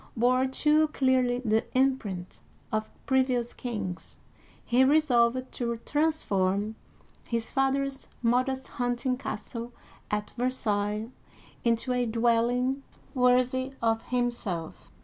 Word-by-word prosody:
bore, 255 +3 +3
too 300 +3 +3
clearly 255 -3 +1
the 220 0 +3
imprint 230 -9 0 0.3
of 215 0 -1 0.2
previous 255 -3 +1
kings, 205 -7 -5 0.5
he 245 +2 +4
resolved 255 -3 +3
to 235 -1 -2
transform 210 -10 +1 0.5
his 230 -1 -2
father's 270 0 0 0.2
modest 255 +3 +1
hunting 245 +1 -1
castle 235 -1 -6 0.4
at 210 0 -2
Versailles 215 -4 -1 0.6
into 235 +2 +1
a 250 0 +1
Versailles. 225 - -3
dwelling 245 +3 +2 0.3
worthy 255 +1 +2
of 225 -1 +1
himself. 235 -9 -2
245 Hz, 105 wpm, -28 LUFS, 225-260 Hz, 0.6 s, he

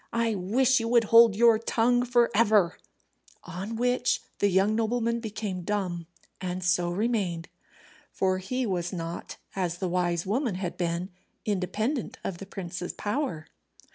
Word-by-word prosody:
I 230 -1 +1
wish 235 +8 +2
you 230 - -2
would 235 0 +4
hold 230 -3 +8
your 230 0 +5
tongue 245 +2 +2
for 240 -1 +3
ever." 210 -5 +3 0.6
On 195 +6 -6
which 245 +1 +1 0.2
the 205 - +3
young 195 +3 +3
nobleman 235 +1 0
became 210 -4 -4
dumb, 175 -3 -2 0.3
and 185 0 -3
so 180 -1 +2
remained. 185 -4 -1 0.6
For 185 -1 0
he 255 +7 -2
was 180 -4 -2
not, 170 -2 -6 0.2
as 175 -3 -1
the 185 0 -2
wise 175 -1 0
woman 225 +1 0
had 180 -2 -4
been, 175 +1 -2 0.3
independent 215 - -2
of 175 -3 -4
the 195 - -8
prince's 180 -2 -5
power. 205 - -3
200 Hz, 145 wpm, -27 LUFS, 180-230 Hz, 0.6 s, hold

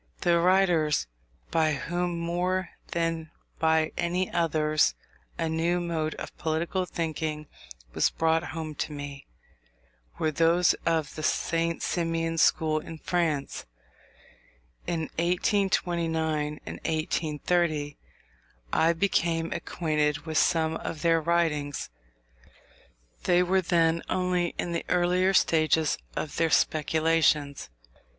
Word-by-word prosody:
The 170 -1 +3
writers 175 - +3 0.5
by 160 -2 +2
whom, 175 +5 -2
more 175 +2 -1 0.2
than 165 -1 -2 0.3
by 160 -1 +2
any 180 +2 0
others, 155 -2 +2 0.4
a 165 - -1
new 165 +2 0
mode 165 -3 -2
of - - -8
political 170 +3 -1
thinking 155 -2 -3 0.5
was - - +3
brought 160 +1 +1
home 160 -1 -5
to - - -3
me, 145 -1 -8 0.9
were 155 - 0
those 165 +3 +3
of 160 -3 0
the 155 - -6
St. 165 +1 0
Simonian 165 -1 -1
school 155 -1 +3
in 160 +1 -9
France. 155 - -2 1.2
In 165 -2 -1 0.2
1829 170 -4 0
and - - -6
1830 155 -1 -1 0.8
I 165 +1 +4
became 165 -2 0
acquainted 150 -3 -1
with 160 -1 +1
some 160 -1 +2
of 155 - -6
their 165 -1 +3
writings. 155 - 0 1.3
They 180 0 +4
were 190 +1 +2
then 165 -2 +2
only 180 -2 0
in 175 - -2
the 170 - -2
earlier 180 +2 +2
stages 160 -2 +3 0.2
of 150 - -4
their 165 -1 +2
speculations. 155 - +2
165 Hz, 110 wpm, -27 LUFS, 155-175 Hz, 1.3 s, I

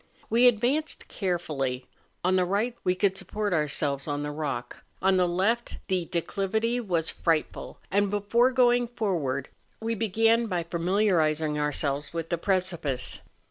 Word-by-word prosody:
We 240 +2 +6
advanced 245 +7 +1
carefully; 150 - -2 0.4
on 185 +1 +3
the 185 - +3
right 205 +7 0
we 180 - +2
could 190 +1 +1
support 205 0 -2
ourselves 145 -3 0
on 145 0 -2
the 150 - -3
rock, 140 -5 -4 0.2
on 190 0 +3
the 180 -1 +3
left 200 +7 0
the 180 -3 0
de¬ 170 -2 0
clivity 220 +5 -1
was 170 -6 0
frightful, 165 -3 -1
and 200 +1 +2
before 205 +5 +3
going 245 -2 +3
forward 170 - -2 0.3
we 225 +1 -2
began 225 +2 +2
by 180 -4 -1
familiarising 165 -4 +1
ourselves 145 0 -2
with 165 -1 -3
the 170 - -1
precipice. 170 -9 -1
185 Hz, 145 wpm, -27 LUFS, 155-220 Hz, 0.4 s, We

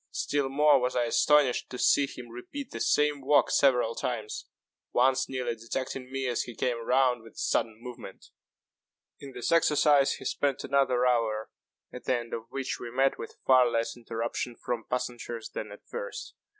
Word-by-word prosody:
Still 145 -2 -1
more 145 +1 +5
was 125 0 -1
I 125 - +2
astonished 135 +2 +3
to 125 - -6
see 140 +2 +4
him 125 -3 -10
repeat 230 - -8
the - - -6
same 150 +3 +2
walk 145 +2 +3
several 125 -4 +3
times 110 -3 -4 0.5
once 130 +1 +3
nearly 125 -3 -2
detecting 125 +3 -5
me 135 0 -2
as 120 -2 0
he 120 - -7
came 120 -1 -1
round 125 -1 +2
with 115 -1 -15
a - - -25
sudden 110 -2 0
movement. 120 -5 -10 0.9
In 140 -1 -10
this 120 - -3
exercise 150 -3 +4
he - - -9
spent 140 -2 -1
another 130 -2 +2
hour, 115 -3 +1 0.4
at 125 - -9
the 130 - +2
end 120 -1 -7
of 115 0 -5
which 135 0 -4
we 120 - -6
met 135 +3 +1
with - - -8
far 130 -2 +6
less 115 0 -1
interruption 115 +1 -4
from 120 -2 -4
passengers 120 -2 -4
than - - -5
at - - -13
first. - - -6
125 Hz, 175 wpm, -28 LUFS, 120-135 Hz, 0.9 s, far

